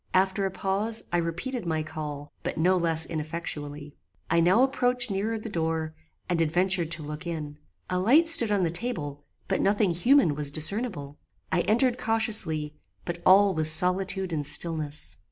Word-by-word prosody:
After 190 +1 +1
a - - -3
pause 200 +4 0
I - - +3
repeated 175 +9 -3
my 160 -1 -1
call, 150 -2 -7
but - - -5
no 180 +4 +2
less 165 -2 +1
ineffectually. 150 -2 -6 0.4
"I 165 - +3
now 185 +9 +4
approached 250 -3 +1
nearer 210 +4 -2
the 220 - -8
door, 160 -4 -3 0.3
and 170 -2 0
adventured 175 +1 +1
to 160 - -6
look 150 +4 -7
in. 150 -3 -6 0.3
A 180 - -2
light 275 - +4
stood 235 -10 +5
on 200 -3 +1
the 165 - 0
table, 160 - -3 0.2
but - - -1
nothing 205 -1 +2
human 235 - +3
was 145 0 -1
discernible. 155 - -3 0.3
I - - +2
entered 240 +3 +1
cautiously, 215 -10 0 0.3
but 175 0 -5
all 195 +1 +6
was 155 -2 +4
solitude 180 +2 +2
and 150 -2 -2
stillness. 155 0 +1
175 Hz, 165 wpm, -26 LUFS, 155-205 Hz, 0.4 s, all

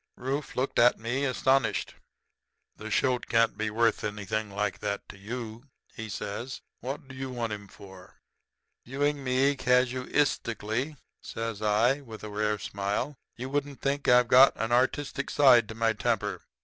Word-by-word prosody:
"Rufe 135 +3 -3
looked 130 +2 0
at 120 +1 +6
me 120 +5 -2
astonished. 135 0 +1 0.8
"'The 110 - -8
shoat 125 +4 +1
can't 115 0 +3
be 110 0 -2
worth 115 +1 +1
anything 105 0 -3
like 100 -2 -2
that 100 - -3
to - - -10
you,' 115 +3 -6 0.3
he 110 0 -7
says. 110 +6 -5 0.2
'What 135 +2 -6
do 135 - -11
you 130 0 -5
want 120 -3 -3
him 100 -1 -8
for?' 95 -2 -14 0.7
"'Viewing 145 +2 -1
me 135 +2 +2
casuistically,' 125 -1 0 0.3
says 115 -2 -5
I, 115 +6 +2
with 110 -6 -11
a 105 - -5
rare 105 0 0
smile, 100 +8 -3 0.2
'you 125 +2 -5
wouldn't 145 0 -3
think 140 +1 -1
that 125 - +7
I've 120 - -6
got 130 +3 +7
an 115 +2 -3
artistic 135 +3 +1
side 125 -6 +5
to 110 - -7
my 115 0 +2
temper. 105 - -1
120 Hz, 160 wpm, -28 LUFS, 105-135 Hz, 0.8 s, that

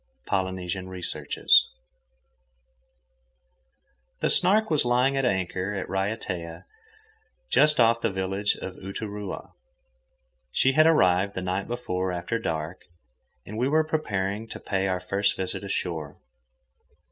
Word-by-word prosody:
—Polynesian 95 -1 -2
Researches. 85 -5 +3 2.6
The - - +1
Snark 210 +2 +4
was 155 - +4
lying 125 +3 +2
at 135 -1 +1
anchor 95 -2 -1
at 95 - -3
Raiatea, 95 -4 -3 0.9
just 150 -2 +5
off 115 0 +4
the 115 - +1
village 95 +1 0
of 95 - -7
Uturoa. 100 +1 -6 1.0
She 130 - +3
had 155 +3 +5
arrived 95 - +3
the 95 - -3
night 95 +2 -2
before, 95 -6 -2
after 90 +6 -2
dark, 80 -4 -3 0.6
and 110 +2 -6
we 130 +3 +1
were 155 +2 +3
preparing 105 -9 -2
to - - -8
pay 95 -1 -1
our 90 -1 0
first 100 +2 0
visit 95 +1 -3
ashore. 85 -6 -3
95 Hz, 120 wpm, -26 LUFS, 90-115 Hz, 2.6 s, just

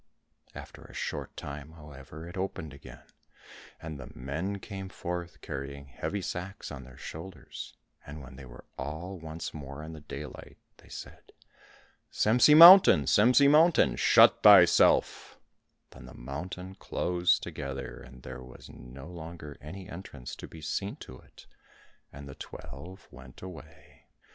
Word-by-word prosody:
After - - -10
a - - -14
short - - -5
time, 70 +2 -8
however, 75 +1 -11
it 85 - -10
opened 90 -6 -4
again, 70 - -13 0.8
and 80 -3 -8
the 65 - -9
men 80 +10 -4
came 95 -1 -8
forth 90 -1 -6
carrying 70 0 -7
heavy 100 +7 -4
sacks 90 +3 -6
on 65 -3 -8
their 65 +1 -15
shoulders, 80 -2 -9 0.3
and 75 +2 -9
when 65 0 -12
they 65 0 -11
were 60 0 -13
all 80 +8 -6
once 80 0 -7
more 70 0 -8
in 80 +1 -8
the 80 - -9
daylight 75 -1 -9 0.2
they - - -20
said, - - -11 0.8
"Semsi 125 +7 +5
mountain, 180 +4 +10
Semsi 125 +6 +5
mountain, 150 - +5
shut - - +5
thyself;" 95 -4 +5 0.5
then - - -13
the - - -13
mountain 90 +8 -7
closed 90 -1 0
together, 70 -2 -6
and 65 0 -14
there 65 0 -8
was 65 -1 -13
no 65 +2 -12
longer 80 -3 -9
any 90 +5 -9
entrance 85 -8 -9
to - - -9
be 80 - -12
seen 100 +6 -3
to 65 - -12
it, - - -18 0.7
and 70 0 -11
the 70 - -9
twelve 80 +13 -11
went 65 0 -14
away. 90 -3 -13
80 Hz, 145 wpm, -29 LUFS, 70-95 Hz, 0.8 s, mountain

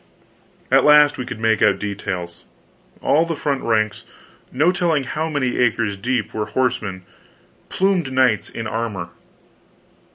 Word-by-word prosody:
At - - +5
last 150 -1 +5
we 125 - -4
could 110 - -6
make 110 -1 +1
out - - +4
details. 95 -4 -5 0.6
All 155 +3 +3
the 165 -1 -3
front 140 -2 -2
ranks, 110 -3 0 0.5
no 155 +7 +3
telling 170 -5 0
how 155 +5 -3
many 140 -5 -1
acres 115 -4 +1
deep, 120 +3 -2
were 105 -1 -2
horsemen 105 -5 -2 0.7
plumed 185 -7 0
knights 130 -5 +2
in 115 - -6
armor. 110 -6 -4
125 Hz, 135 wpm, -20 LUFS, 105-145 Hz, 0.7 s, At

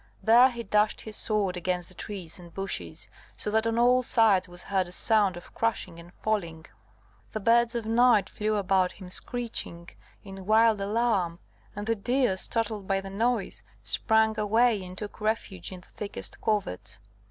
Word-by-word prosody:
There 240 +4 +7
he 235 -2 -6
dashed 210 0 +1
his 215 -1 -8
sword 205 -4 0
against 180 0 -2
the - - -10
trees 185 -3 -6
and 175 -1 -13
bushes, 195 +2 -4 0.3
so 210 - -2
that 220 +1 +2
on 230 0 0
all 250 +2 +5
sides 210 -7 +3
was 175 0 -8
heard 190 -2 0
a - - -11
sound 200 -1 +2
of 175 - -13
crashing 185 -7 -2
and 170 +1 -13
falling. 170 -7 -3 0.7
The 215 - -2
birds 235 +2 +3
of 230 -2 -2
night 225 -3 +4
flew 215 0 -2
about 190 -2 +1
him 185 -2 -11
screeching 215 -8 -2 0.3
in 195 -1 -10
wild 220 -1 +4
alarm; 200 -5 0 0.4
and 205 +1 -5
the 230 - +1
deer, 245 0 +1
startled 220 -1 -2
by 195 -1 +1
the 195 0 -8
noise, 215 - -1 0.2
sprang 220 - +2
away 220 0 +2
and 185 0 -9
took 210 +1 -7
refuge 215 -5 -2
in 185 -1 -9
the - - -22
thickest 205 -1 -6
coverts. 205 - -2
210 Hz, 175 wpm, -27 LUFS, 185-225 Hz, 0.7 s, There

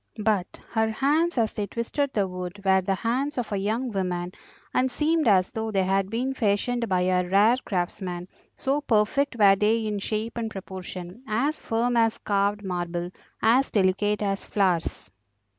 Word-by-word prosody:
But 205 -4 0
her 220 -1 +1
hands 295 +8 +1
as 225 -2 +1
they 205 -1 -3
twisted 260 +6 -2
the 200 -5 +1
wood 180 +1 -6
were 190 0 +4
the 195 +1 0
hands 255 +8 -1
of 240 -3 -2
a 200 - 0
young 225 +6 -1
woman, 180 -3 -2 0.4
and 255 +1 +2
seemed 310 +2 +1
as 190 -3 +4
though 220 0 -3
they 195 -3 +1
had 195 +1 +1
been 250 +5 -1
fashioned 235 +1 0
by 185 -1 +2
a 180 0 +1
rare 210 +6 +5
craftsman, 180 -1 -3 0.3
so 275 +2 0
perfect 235 +3 +1
were 200 -3 +6
they 220 +3 +1
in 210 -1 -2
shape 220 +3 -3
and 225 -1 -2
proportion, 185 0 -8
as 255 +8 0
firm 235 +2 0
as 225 -1 +3
carved 205 0 0
marble, 175 -1 -3 0.3
as 250 +5 +4
delicate 205 +1 +1
as 195 -1 -2
flowers. 180 - 0
210 Hz, 170 wpm, -26 LUFS, 190-235 Hz, 0.4 s, were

